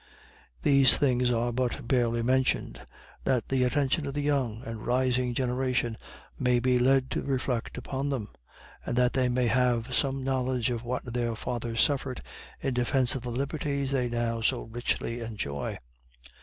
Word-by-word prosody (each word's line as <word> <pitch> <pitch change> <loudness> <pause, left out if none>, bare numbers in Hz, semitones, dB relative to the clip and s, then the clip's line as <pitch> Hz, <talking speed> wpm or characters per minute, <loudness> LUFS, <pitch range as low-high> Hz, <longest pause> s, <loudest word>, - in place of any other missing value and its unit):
These 140 -2 +6
things 125 -3 +2
are 120 0 0
but 120 -1 -2
barely 120 -2 +2
mentioned, 130 +2 0 0.4
that 130 -3 0
the 130 -1 +2
attention 140 +4 +1
of 140 - -5
the 145 - -1
young 130 -6 0
and 115 -1 -6
rising 125 0 +1
generation 125 -2 0 0.4
may 125 -2 +3
be 125 0 +2
led 130 +1 +3
to - - -1
reflect 130 -3 -2
upon 135 +3 -3
them. 120 -7 -3 0.5
And - - -3
that 125 0 +3
they 130 -2 +2
may 125 0 +1
have 125 0 +1
some 135 0 0
knowledge 130 -2 0
of 120 -1 -3
what 125 +1 -3
their 120 -1 -2
fathers 115 0 -2
suffered 135 -4 0 0.4
in 135 - -1
defence 125 +1 +2
of 130 - -3
the 125 - -5
liberties 140 +2 -2
they 125 -3 +1
now 120 -1 -1
so 125 +2 +1
richly 120 0 -3
enjoy. 105 -12 -4
125 Hz, 160 wpm, -28 LUFS, 120-130 Hz, 0.5 s, These